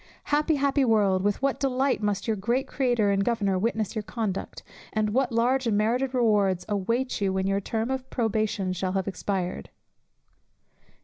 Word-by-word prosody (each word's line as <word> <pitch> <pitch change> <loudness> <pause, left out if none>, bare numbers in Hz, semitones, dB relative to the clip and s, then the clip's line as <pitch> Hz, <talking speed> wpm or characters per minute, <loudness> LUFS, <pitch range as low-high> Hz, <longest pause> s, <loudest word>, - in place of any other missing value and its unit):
"Happy, 305 +2 +3
happy 280 0 +2
world, 205 -6 +3
with 205 +1 0
what 275 -1 +1
delight 265 -2 +1
must 205 -2 -1
your 220 - +1
great 235 +7 0
Creator 240 -6 +1
and 195 0 +2
Governor 200 -5 0
witness 220 +1 -1
your 215 - -1
conduct, 210 -2 -4 0.3
and 215 -1 0
what 255 +2 +1
large 245 +3 +1
and 210 -3 +2
merited 245 +5 +1
rewards 205 -6 +2
await 230 +5 -1
you 195 -1 +1
when 190 0 -1
your 195 +1 +1
term 225 +4 -2
of 265 0 -4
probation 215 -4 -1
shall 185 +1 -2
have 190 0 -1
expired. 190 -2 -3
220 Hz, 170 wpm, -26 LUFS, 195-250 Hz, 0.3 s, Happy